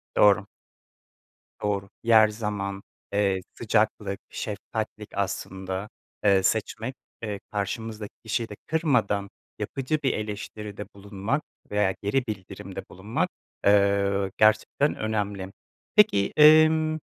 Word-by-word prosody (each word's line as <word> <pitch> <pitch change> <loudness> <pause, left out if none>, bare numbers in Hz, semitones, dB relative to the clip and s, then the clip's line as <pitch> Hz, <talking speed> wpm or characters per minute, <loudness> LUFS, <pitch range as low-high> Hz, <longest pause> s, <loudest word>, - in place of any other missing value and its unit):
Doğru. 105 0 +5 1.2
Doğru. 100 -1 -1
Yer, 110 -1 +7
zaman, 100 -3 -3 0.3
eee, 100 -2 +2
sıcaklık, 105 -3 0
şefkatlik - - -5
aslında, 95 +2 -3 0.3
eee, 100 -2 +5
seçmek, - - -1 0.3
eee, 105 -2 -3
karşımızdaki 105 +1 -4
kişiyi 115 +1 -1
de 105 - -7
kırmadan 125 - +1 0.3
yapıcı 135 +3 -1
bir 135 - +2
eleştiride 105 -1 -5
bulunmak 100 +7 -2 0.3
veya 105 -2 +2
geri 115 +6 +1
bildirimde 95 -4 -6
bulunmak, 115 - -2 0.4
eee, 100 -1 +3
gerçekten 110 +7 +3
önemli. 100 -3 -2 0.4
Peki, 210 - +5
emm, 155 +1 +6
105 Hz, 100 wpm, -26 LUFS, 100-115 Hz, 1.2 s, Yer